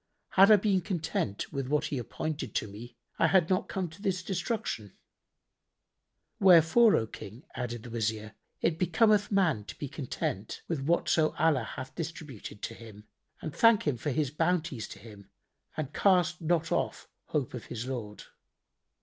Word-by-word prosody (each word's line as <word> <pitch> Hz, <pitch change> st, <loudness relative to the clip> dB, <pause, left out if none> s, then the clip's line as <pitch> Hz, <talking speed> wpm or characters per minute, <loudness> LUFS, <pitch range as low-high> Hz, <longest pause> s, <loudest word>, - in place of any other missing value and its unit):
Had 195 Hz, +2 st, +6 dB
I 215 Hz, -, +10 dB
been 195 Hz, -2 st, +2 dB
content 165 Hz, -, -3 dB
with 135 Hz, -2 st, -2 dB
what 150 Hz, +2 st, +1 dB
He 140 Hz, -3 st, -2 dB
appointed 140 Hz, 0 st, -4 dB
to -, -, 0 dB
me, 115 Hz, +4 st, -11 dB, 0.2 s
I -, -, +5 dB
had 185 Hz, -2 st, +3 dB
not 185 Hz, -, +1 dB
come 190 Hz, -2 st, -2 dB
to 165 Hz, +6 st, -15 dB
destruction." 185 Hz, -, -2 dB, 1.4 s
"Wherefore, 190 Hz, +4 st, +6 dB
O 110 Hz, -, +1 dB
King," 110 Hz, +3 st, -10 dB
added 120 Hz, -2 st, -4 dB
the 120 Hz, -, -9 dB
Wazir, 110 Hz, -1 st, -2 dB, 0.3 s
"it 165 Hz, -1 st, +1 dB
becometh 205 Hz, +4 st, +3 dB
man 175 Hz, -, +2 dB
to -, -, -8 dB
be 145 Hz, -, -4 dB
content 120 Hz, -7 st, -4 dB
with 165 Hz, -4 st, -1 dB
whatso 160 Hz, +1 st, +2 dB
Allah 160 Hz, -3 st, +2 dB
hath 130 Hz, 0 st, -7 dB
distributed 150 Hz, -, -7 dB
to -, -, -3 dB
him 110 Hz, -3 st, -12 dB, 0.4 s
and 155 Hz, -, -4 dB
thank 230 Hz, -2 st, +5 dB
Him 145 Hz, -5 st, +1 dB
for 150 Hz, -, -3 dB
His 145 Hz, -1 st, 0 dB
bounties 155 Hz, -7 st, 0 dB
to -, -, -10 dB
him 100 Hz, -1 st, -13 dB, 0.5 s
and 150 Hz, -2 st, -3 dB
cast 180 Hz, -3 st, +3 dB
not 165 Hz, 0 st, 0 dB
off -, -, -1 dB, 0.2 s
hope 145 Hz, -5 st, -2 dB
of 125 Hz, -, -6 dB
his 120 Hz, 0 st, -5 dB
Lord. 115 Hz, -6 st, -5 dB
150 Hz, 160 wpm, -30 LUFS, 115-180 Hz, 1.4 s, I